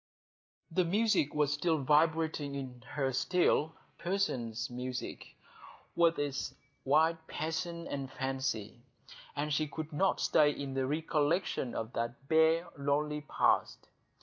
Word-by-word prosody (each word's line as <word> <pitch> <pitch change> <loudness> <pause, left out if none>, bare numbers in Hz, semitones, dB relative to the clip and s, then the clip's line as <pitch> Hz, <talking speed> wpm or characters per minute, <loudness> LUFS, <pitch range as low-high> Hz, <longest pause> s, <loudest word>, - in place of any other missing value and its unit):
The 185 +3 +3
music 190 -5 +2
was 150 0 +2
vibrating 155 -1 +2
in 130 -3 -6
her 135 -2 0
still,—Purcell's 155 - 0
music, 125 0 -6 0.6
with 170 -1 +4
its 145 -1 -2 0.3
wild 160 +4 +4
passion 170 +2 -3
and 135 -1 -4
fancy,—and 135 +3 -4
she 155 +1 +1
could 155 +1 -6
not 190 +6 +2
stay 150 -1 +4
in 140 -2 -4
the 135 -1 0
recollection 150 -1 0
of 115 +2 -4
that 120 +4 -4
bare, 160 +2 +4
lonely 150 +2 0
past. - - +1
150 Hz, 110 wpm, -32 LUFS, 135-160 Hz, 0.6 s, with